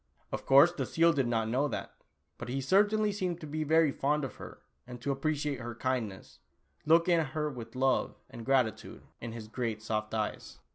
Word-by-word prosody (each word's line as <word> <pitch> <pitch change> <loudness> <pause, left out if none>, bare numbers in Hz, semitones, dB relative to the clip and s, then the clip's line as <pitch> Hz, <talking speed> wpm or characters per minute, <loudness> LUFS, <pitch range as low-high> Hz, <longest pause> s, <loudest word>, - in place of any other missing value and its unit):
Of - - -5
course 140 +6 +7
the 175 - -4
seal 165 +1 +3
did 135 -4 +1
not 115 -2 0
know 130 +6 +1
that, - - -5 0.5
but - - -6
he 135 +2 -1
certainly 205 +8 +3
seemed 185 -4 -2
to - - -6
be 155 +1 -3
very 160 0 +4
fond 150 +2 0
of 130 - -8
her, - - -11 0.2
and 125 -1 -8
to 140 +3 -1
appreci 150 +1 -1
ate 140 - -4
her 120 -1 -6
kindness, 120 -6 -3 0.5
looking 170 +2 +5
at 150 -5 -3
her 150 -1 0
with 115 -2 -9
love 130 +1 +1
and 120 -2 -10
gratitude, 115 -5 0 0.2
in 115 -1 -6
his 115 -2 -8
great 110 -2 -3
soft 110 -1 -2
eyes. 110 -1 -4
135 Hz, 200 wpm, -31 LUFS, 115-155 Hz, 0.5 s, course